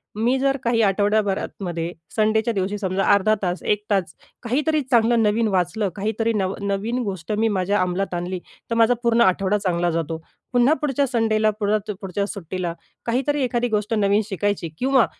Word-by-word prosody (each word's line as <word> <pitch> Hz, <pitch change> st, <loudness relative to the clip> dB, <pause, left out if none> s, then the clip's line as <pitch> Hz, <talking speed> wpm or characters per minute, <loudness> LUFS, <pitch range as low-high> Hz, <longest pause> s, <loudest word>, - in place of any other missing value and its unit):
मी 240 Hz, +5 st, +1 dB
जर 275 Hz, +1 st, +1 dB
काही 230 Hz, -1 st, +2 dB
आठवड्याभरातमध्ये, 195 Hz, -4 st, -1 dB, 0.2 s
संडेच्या 220 Hz, +1 st, +2 dB
दिवशी, 200 Hz, +1 st, -1 dB
समजा 190 Hz, -1 st, -1 dB
अर्धा 210 Hz, +2 st, +3 dB
तास, 180 Hz, 0 st, -1 dB
1 210 Hz, 0 st, 0 dB
तास 185 Hz, -5 st, +1 dB, 0.3 s
काहीतरी 300 Hz, +6 st, +1 dB
चांगलं 235 Hz, -2 st, +3 dB
नवीन 220 Hz, +2 st, +2 dB
वाचलं, 190 Hz, +2 st, 0 dB
काहीतरी 220 Hz, +3 st, -1 dB
नवं 200 Hz, 0 st, -2 dB
नवीन 215 Hz, +5 st, -1 dB
गोष्ट 190 Hz, -3 st, -5 dB
मी 220 Hz, +2 st, +2 dB
माझ्या 200 Hz, 0 st, +1 dB
अंमलात 185 Hz, +1 st, -1 dB
आणली, 175 Hz, +1 st, -3 dB, 0.3 s
तर 230 Hz, -, -1 dB
माझा 230 Hz, +1 st, +5 dB
पूर्ण 235 Hz, 0 st, +3 dB
आठवडा 195 Hz, +1 st, +3 dB
चांगला 175 Hz, -3 st, 0 dB
जातो. 165 Hz, -1 st, -2 dB, 0.4 s
पुन्हा 245 Hz, +5 st, +5 dB
पुढच्या 280 Hz, -1 st, +1 dB
संडेला 220 Hz, -2 st, +2 dB
पुढ 205 Hz, 0 st, 0 dB, 0.3 s
पुढच्या 195 Hz, +1 st, -2 dB
सुट्टीला, 180 Hz, -3 st, -4 dB, 0.3 s
काहीतरी 270 Hz, +5 st, 0 dB
एखादी 245 Hz, -1 st, 0 dB
गोष्ट 210 Hz, 0 st, -1 dB
नवीन 205 Hz, 0 st, +3 dB
शिकायची 205 Hz, -4 st, -2 dB
किंवा 260 Hz, -2 st, +4 dB
210 Hz, 160 wpm, -22 LUFS, 190-230 Hz, 0.4 s, माझा